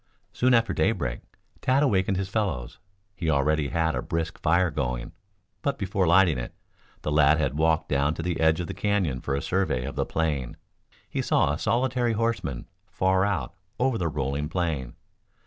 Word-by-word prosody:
Soon 125 0 +3
after 115 -1 +2
daybreak, 70 - 0 0.4
Tad 135 +3 +3
awakened 95 -6 +2
his 95 0 -2
fellows. 95 - -2 0.4
He 85 -3 -2
already 75 0 +2
had 80 +1 0
a - - -2
brisk 80 -1 -3
fire 85 +2 +3
going, 60 -4 -3 0.5
but 140 +3 -1
before 95 -3 0
lighting 85 -5 +5
it, - - -6 0.5
the 75 - -1
lad 75 0 +5
had 65 -4 0
walked 80 +1 +1
down 70 +2 +1
to 80 - -5
the 90 -1 -2
edge 80 0 +3
of 90 - -2
the - - -5
canyon 95 -11 0
for 70 - -2
a 70 - -3
survey 90 -10 0
of 70 - -5
the - - +1
plain. 75 -6 -2 0.5
He - - -2
saw 75 - +2
a 75 - -4
solitary 120 -1 +1
horseman 105 - -2 0.2
far 95 +1 +2
out 85 -11 -2 0.3
over 125 -2 +1
the 85 - 0
rolling 75 0 -2
plain. 80 -8 -2
80 Hz, 180 wpm, -26 LUFS, 70-95 Hz, 0.5 s, lighting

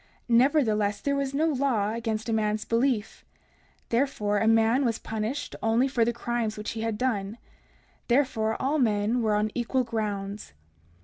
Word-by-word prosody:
Nevertheless, 230 -5 +3
there 280 0 -1
was 275 -1 -2
no 310 +3 +2
law 255 -9 +1
against 225 -1 -3
a 225 - 0
man's 215 -1 0
belief; 230 -2 0 0.7
therefore, 230 -5 0
a 220 - +1
man 225 +4 +4
was 230 -3 0
punished 225 +6 -4
only 225 +4 +2
for 255 -4 +1
the 235 - +2
crimes 235 -2 -2
which 210 - -4
he 225 - -5
had 225 -1 -2
done; 215 -4 -1 0.7
therefore 230 -4 +1
all 290 +3 0
men 220 0 +1
were 215 -2 +1
on 210 +1 0
equal 250 +2 0
grounds. 210 -3 -4
225 Hz, 160 wpm, -27 LUFS, 215-255 Hz, 0.7 s, man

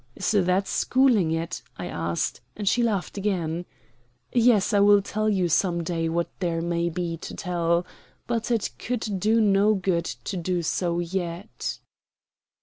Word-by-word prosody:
"Is - - -1
that 190 -1 +2
schooling 250 -10 +3
it?" 165 +2 -2 0.2
I 90 - -5
asked, 85 -1 -2 0.2
and 205 -1 -4
she 240 - +3
laughed 205 -4 -1
again. 175 -4 -1 0.7
"Yes, 235 -4 +4
I 205 - +5
will 205 0 +6
tell 215 +2 -1
you 190 -4 +2
some 170 +1 +1
day 165 -1 -1
what 170 +1 0
there 170 -3 -1
may 170 0 0
be 170 -1 -3
to - - -8
tell. 170 -1 0 0.4
But 235 -1 -2
it 230 -4 0
could 220 -5 -2
do 220 +4 +3
no 210 0 +4
good 180 -3 0
to 190 - -5
do 175 0 -1
so 170 +1 0
yet." 175 +2 -3
185 Hz, 155 wpm, -25 LUFS, 170-210 Hz, 0.7 s, will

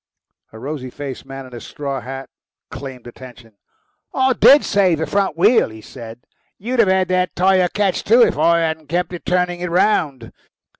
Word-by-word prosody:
A 110 - -12
rosy 130 +1 -6
faced 135 0 -8
man 135 0 -8
in 130 - -14
a 120 - -8
straw 140 -2 -5
hat 135 +2 -7 0.4
claimed 130 -3 -9
attention. 120 -3 -13 0.6
"I 260 0 +2
DID 280 +3 +6
save 185 -5 +2
the 160 - -2
front 195 -5 -1
wheel," 210 - +4
he 110 0 -12
said; 115 0 -11 0.4
"you'd 240 +5 -3
have 225 - +5
had 190 0 +2
that 185 0 0
tyre 185 0 +3
catch, 200 -1 -1
too, 235 +3 +5
if - - +1
I 165 +3 +3
hadn't 160 -2 -3
kept 180 +1 -2
turning 180 -1 0
it 180 0 -4
round." 160 - 0
165 Hz, 180 wpm, -19 LUFS, 130-185 Hz, 0.6 s, DID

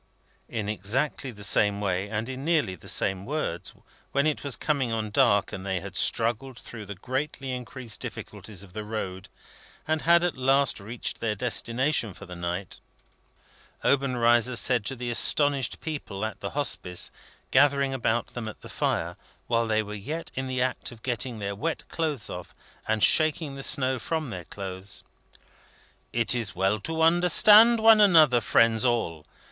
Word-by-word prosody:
In 105 -3 -3
exactly 125 +7 -2
the 105 -4 -9
same 105 0 +3
way, 95 0 -2
and 110 +1 -3
in 130 0 -6
nearly 155 - +1
the 90 - -13
same 95 -1 +2
words, 135 - -3 0.4
when 140 +1 +2
it 155 -1 -1
was 140 -3 -1
coming 140 -5 -1
on 110 -2 -3
dark 100 0 +3
and 95 - -6
they 95 -2 -2
had 95 0 -9
struggled 120 +5 +1
through 110 -4 -9
the 100 - -6
greatly 130 +5 -4
increased 125 -2 -5
difficulties 105 -4 -7
of 95 -3 -15
the 110 - -5
road, 100 -3 -5 0.6
and 155 0 0
had 170 +1 +4
at 175 - 0
last 135 0 +2
reached 110 +4 -4
their 110 -2 -1
destination 120 0 0
for 100 - -11
the 90 -1 -9
night, 85 +2 -5 1.0
Obenreizer 125 -3 +2
said 120 -2 +2
to 135 - -3
the 120 -1 -4
astonished 140 +1 +3
people 145 -11 -5
of 110 - -6
the 100 - -4
Hospice, 90 -11 -1 0.4
gathering 140 0 +3
about 120 -2 -1
them 120 -3 -6
at 110 - -9
the - - -11
fire, - - -2 0.3
while 115 -1 +1
they 110 0 +1
were 105 0 -8
yet 145 +11 -6
in 130 0 -4
the 130 -1 0
act 130 -1 -3
of 115 -2 -14
getting 125 -1 -2
their 100 -1 -4
wet 160 +11 -3
shoes 150 -8 -1
off, 90 0 -8 0.3
and 110 -1 +1
shaking 155 -2 +3
the 135 - -7
snow 130 -1 +2
from 155 +1 -3
their 90 -5 -7
clothes: 95 +1 -7 1.1
"It 115 0 +1
is 115 -8 -2
well 95 +3 +1
to 160 +8 -2
understand 205 +7 +7
one 220 -1 +7
another, 155 - +6
friends 115 0 +3
all. 115 -11 -1
120 Hz, 170 wpm, -26 LUFS, 105-140 Hz, 1.1 s, understand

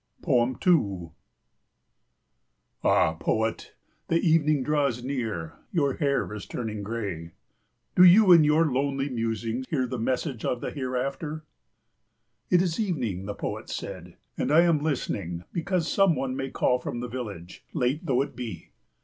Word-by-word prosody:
2 120 - +2 1.7
"Ah, 80 - +4
poet, 110 0 -1 0.3
the 165 - +2
evening 155 -4 +3
draws 140 -4 0
near; 115 - -4
your 140 -6 +1
hair 140 -7 0
is 105 - -7
turning 110 -3 -4
grey. 100 -7 -5 0.6
"Do 180 - +7
you 185 +2 +8
in 165 -3 +8
your 150 +2 +4
lonely 140 0 0
musing 115 0 -2
hear 135 -5 0
the 125 -1 -4
message 130 +1 -2
of 125 - -1
the - - -4
hereafter?" 140 +4 -3 1.0
"It 180 0 +4
is 170 0 -2
evening," 120 - -2
the 100 - -4
poet - - -5
said, - - -7 0.2
"and 135 - 0
I 160 +3 +7
am 170 -3 +3
listening 100 - -2
because 170 0 -1
some 195 -3 +3
one 130 -1 -2
may 135 0 -3
call 125 -1 +1
from 120 - -5
the 125 - -4
village, 105 -8 -7
late 130 +6 0
though 135 -5 +2
it - - -9
be. 115 -7 -7
130 Hz, 145 wpm, -26 LUFS, 115-155 Hz, 1.7 s, you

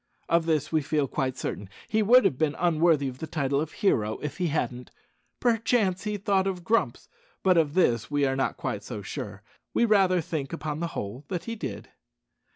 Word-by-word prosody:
Of 170 0 +2
this 155 -3 +1
we 160 -1 +2
feel 150 -1 0
quite 130 -1 -2
certain. 100 -1 -4 0.2
He 220 0 +1
would 235 +2 +6
have 170 - +3
been 150 +1 0
unworthy 165 -4 +3
the 130 +6 -7
title 140 -2 0
of 155 0 -4
hero 110 - +1
if 150 - -4
he 180 - 0
hadn't. 125 -5 -2 0.5
Perchance 225 -5 +1
he 210 0 -1
thought 195 -1 +1
of 180 -2 -3
Grumps, 180 - 0 0.4
but 185 -1 +5
of 160 -2 +2
this 120 - +2
we 145 -1 +1
are 135 0 +1
not 135 - -1
quite - - -3
so - - -7
sure. - - -6 0.3
We 235 - +4
rather 195 -4 +4
think, 150 -3 -4
upon 155 -2 -4
the 170 - -1
whole, 110 +8 -5
that 180 -3 -3
he 230 - -4
did. 115 - -6
160 Hz, 195 wpm, -27 LUFS, 135-190 Hz, 0.5 s, would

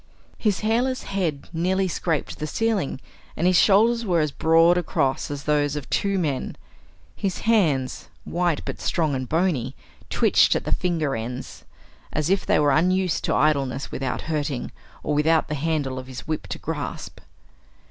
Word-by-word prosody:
His 210 -4 +1
hairless 245 +4 0
head 170 -8 -2
nearly 185 +3 +1
scraped 165 -3 -2
the 155 - -3
ceiling, 210 -7 -1 0.4
and 170 - 0
his 185 0 +4
shoulders 230 +4 +4
were 180 -6 +1
as 150 -2 +1
broad 165 +3 +4
across 140 -6 0
as 145 -1 -5
those 145 -1 +1
of 145 -2 -5
two 200 -1 +1
men. 150 -7 -2 0.6
His 190 -2 -3
hands, 160 - +1
white 175 -3 0
but - - -5
strong 160 -4 0
and 130 -1 -3
bony, 155 -7 0 0.3
twitched - - +4
at - - -1
the - - -3
finger 160 -6 0
ends 120 +3 -6 0.5
as 155 +3 -1
if 195 -1 +1
they - - +4
were 145 -1 +3
unused 180 +4 +2
to - - +1
idleness 140 -3 +1
without 130 -1 -3
hurting, 150 -4 -3 0.3
or 150 - -1
without 155 +2 +2
the - - -2
handle 145 -3 -1
of 130 - -9
his 130 -1 -9
whip 155 -10 -3
to 90 - -4
grasp. - - -5
160 Hz, 165 wpm, -24 LUFS, 140-185 Hz, 0.6 s, his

